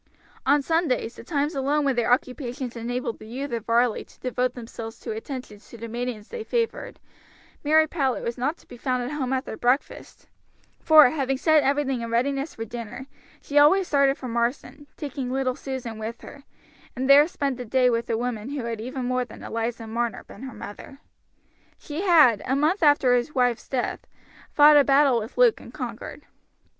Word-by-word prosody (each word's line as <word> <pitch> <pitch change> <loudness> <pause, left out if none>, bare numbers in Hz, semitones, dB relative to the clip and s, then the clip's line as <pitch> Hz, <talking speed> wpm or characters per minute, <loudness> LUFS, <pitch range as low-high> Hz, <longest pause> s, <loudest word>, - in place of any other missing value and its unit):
On 285 +1 +4
Sundays, 320 -7 0
the - - -11
times 295 0 -1
alone 285 +2 0
when 270 -2 +1
their 240 0 +1
occupations 250 0 -1
enabled 235 0 -4
the 215 - -11
youth 270 +5 -5
of 230 -2 -4
Varley 235 0 +2
to - - -23
devote 250 0 -1
themselves 225 -2 -8
to - - -5
attentions 220 -2 -8
to 235 - -11
the 230 +1 -7
maidens 235 -2 -5
they 470 -2 -6
favored, 460 0 -2 0.6
Mary 315 +1 +5
Powlett 280 -5 -1
was 235 - -3
not 285 +7 -2
to - - -23
be 245 - -11
found 255 0 -1
at 245 - -4
home 270 -4 -3
after 260 -4 -2
breakfast, 250 +5 -2 0.5
for, 310 -5 +7
having 270 -3 -1
set 315 +2 +4
everything 275 -3 0
in 230 - -5
readiness 275 +5 -1
for 225 - -5
dinner, 235 +2 -7 0.4
she 290 0 +2
always 365 +6 +5
started 280 -1 +3
for 255 - -7
Marsden, 245 +4 -3
taking 275 -4 -5
little 260 -1 -1
Susan 250 -5 -6
with 225 +2 -6
her, 280 -1 -12 0.5
and 260 +1 -2
there 285 +2 +7
spent 280 -6 -2
the 250 - -5
day 255 +2 +2
with 235 -1 0
the 225 - 0
woman 240 -1 -3
who 285 -3 -4
had 230 -2 -4
even 255 +2 -4
more 250 0 0
than 245 - -12
Eliza 230 0 -3
Marner 230 0 -3
been - - -14
her 265 -2 -8
mother. 240 +6 -10 0.8
She 300 +3 -6
had, 305 - +5
a 265 - +1
month 310 +8 +1
after 290 -5 +4
his 245 +5 0
wife's 245 -3 +1
death, 255 -3 -3 0.4
fought 295 0 +7
a 285 - +7
battle 275 -3 +4
with 220 +3 -8
Luke - - +5
and - - -12
conquered. - - -7
255 Hz, 190 wpm, -25 LUFS, 235-285 Hz, 0.8 s, for